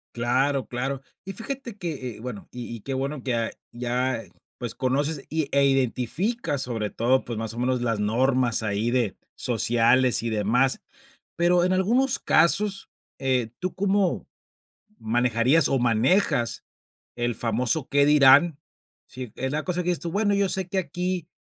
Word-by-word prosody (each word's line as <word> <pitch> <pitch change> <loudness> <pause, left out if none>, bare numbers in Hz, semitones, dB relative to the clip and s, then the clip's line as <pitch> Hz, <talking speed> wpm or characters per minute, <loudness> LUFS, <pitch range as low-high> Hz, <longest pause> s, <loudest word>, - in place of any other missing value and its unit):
Claro, 130 +3 +1
claro. 130 +2 -3 0.2
Y 195 - -6
fíjate 240 -1 -5
que, 145 - -5
eh, - - -14
bueno, 115 -3 -8
y 120 -1 -7
y 115 - -10
qué 135 - -5
bueno 135 +1 -3
que, 125 - -1
ah, 115 -1 -1 0.2
ya, 125 0 -1
eh, 90 - -19 0.3
pues, 120 -3 -5
conoces 140 +3 -1
y 160 -2 -1
e 140 0 +4
identificas, 135 - 0
sobre 115 -4 -3
todo, 125 +5 +1
pues, 115 -2 -5
más 110 0 -3
o - - -10
menos, 125 0 0
las 115 -3 -1
normas 125 +2 +1
ahí 110 +2 -1
de 120 -5 0 0.2
sociales 120 +2 +2
y 115 - -2
demás. 115 +5 +1 0.6
Pero 175 +1 +3
en 185 +1 +2
algunos 245 +8 +2
casos, 195 +5 +2 0.3
eh, 130 -4 0
¿tú 185 0 -4
cómo 195 -1 0 0.7
manejarías 120 +6 +2
o 135 - +1
manejas 120 - +1 0.5
el 120 0 -1
famoso 120 +6 0
qué 140 0 +3
dirán?, 145 +2 +6 0.5
si 125 -2 -8
es 130 +1 -3
la 155 +1 -1
cosa 180 -1 -1
que 175 - -4
dices 175 - -1
tú: 170 - -4
"Bueno, 205 +1 +1
yo 200 -1 +1
sé 190 -1 -3
que 195 0 -2
aquí 180 -1 -3
130 Hz, 165 wpm, -25 LUFS, 120-170 Hz, 0.7 s, dirán